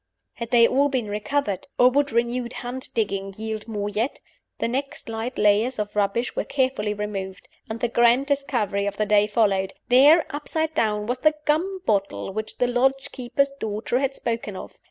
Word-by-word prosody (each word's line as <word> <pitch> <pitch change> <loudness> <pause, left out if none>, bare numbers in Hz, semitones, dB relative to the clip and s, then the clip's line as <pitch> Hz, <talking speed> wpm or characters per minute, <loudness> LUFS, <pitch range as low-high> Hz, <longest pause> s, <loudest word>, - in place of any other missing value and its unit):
Had 235 -1 -6
they 235 -1 +6
all 280 +2 +2
been 250 -6 -2
recovered? 210 0 -2
or 250 +1 +6
would 285 +1 +1
renewed 240 +1 -1
hand 250 +2 -5
digging 195 -3 -1
yield 220 0 -5
more 205 -2 -3
yet? 215 +6 -2 0.4
The - - -1
next 270 +3 -4
light 225 +3 -4
layers 215 +5 +3
of 210 -1 -4
rubbish 210 +4 0
were - - 0
carefully 260 -6 0
removed 195 -2 -5 0.2
and 225 +1 -5
the 240 - +2
grand 240 +3 +4
discovery 240 -8 0
of 200 0 -4
the 215 - +1
day 210 0 +4
followed. 200 -3 +1 0.2
There 285 +7 +7
(upside 315 +2 -2
down) 210 -7 0
was 245 +3 -2
the 310 +3 +3
gum 365 +6 0
bottle 200 -2 -1
which 215 +1 -5
the 250 - +2
lodge 265 +3 +1
keeper's 265 +2 0
daughter 220 +3 -1
had 270 0 -1
spoken 230 -4 -3
of. - - -9
235 Hz, 180 wpm, -24 LUFS, 210-265 Hz, 0.4 s, There